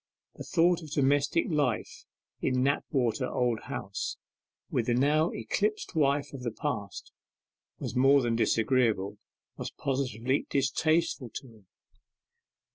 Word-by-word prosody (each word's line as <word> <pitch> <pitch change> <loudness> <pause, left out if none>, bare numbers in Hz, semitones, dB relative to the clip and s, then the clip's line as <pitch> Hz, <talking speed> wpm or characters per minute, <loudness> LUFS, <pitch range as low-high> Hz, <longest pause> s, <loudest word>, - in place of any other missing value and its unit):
The - - -8
thought 175 0 +2
of 155 - -9
domestic 145 +3 +2
life 145 -8 -1 0.3
in 130 0 +1
Knapwater 130 -3 0
Old 120 -3 +1
House, - - -4 0.5
with 115 - 0
the 120 - +2
now 150 +6 +3
eclipsed 210 -1 -2
wife 145 -2 +1
of 135 - -7
the 120 - -2
past, 100 -2 -4 0.7
was - - -5
more 135 +2 +5
than 115 -1 +1
disagreeable, 110 -4 +1 0.4
was - - -4
positively 130 -1 -1
distasteful 145 0 +1
to 135 - -6
him. 110 -4 -19
135 Hz, 120 wpm, -29 LUFS, 120-145 Hz, 0.7 s, more